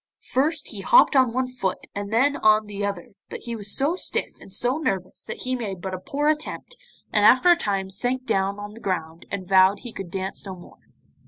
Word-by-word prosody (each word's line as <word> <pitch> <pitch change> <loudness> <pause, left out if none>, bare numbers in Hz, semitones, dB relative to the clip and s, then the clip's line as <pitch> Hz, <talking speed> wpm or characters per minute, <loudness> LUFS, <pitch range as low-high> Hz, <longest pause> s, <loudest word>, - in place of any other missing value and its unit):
First 295 +5 0
he - - -7
hopped - - +5
on 260 -3 +4
one 255 +2 -1
foot 245 -8 -3
and 200 0 -5
then 270 +6 +3
on 215 0 +4
the 205 -1 -6
other, 200 -4 -3 0.2
but - - -7
he 235 -1 -5
was 205 -2 -2
so 290 +6 +1
stiff - - -1
and - - -14
so 245 +8 +1
nervous 190 - -3
that - - -7
he 255 0 -1
made 205 -7 -5
but 190 +1 -5
a 185 - -4
poor 285 +10 -2
attempt, 310 +10 -1 0.4
and 210 - +3
after 260 +11 +7
a - - +7
time 195 - -2
sank 250 +6 -1
down 195 -1 0
on 205 0 -7
the 225 - -12
ground 165 -3 -4
and 190 -2 -5
vowed 190 +1 +5
he 240 -3 -9
could 190 -3 -7
dance 190 +1 -4
no 190 -2 -7
more. 175 - -15
205 Hz, 225 wpm, -24 LUFS, 190-255 Hz, 0.4 s, after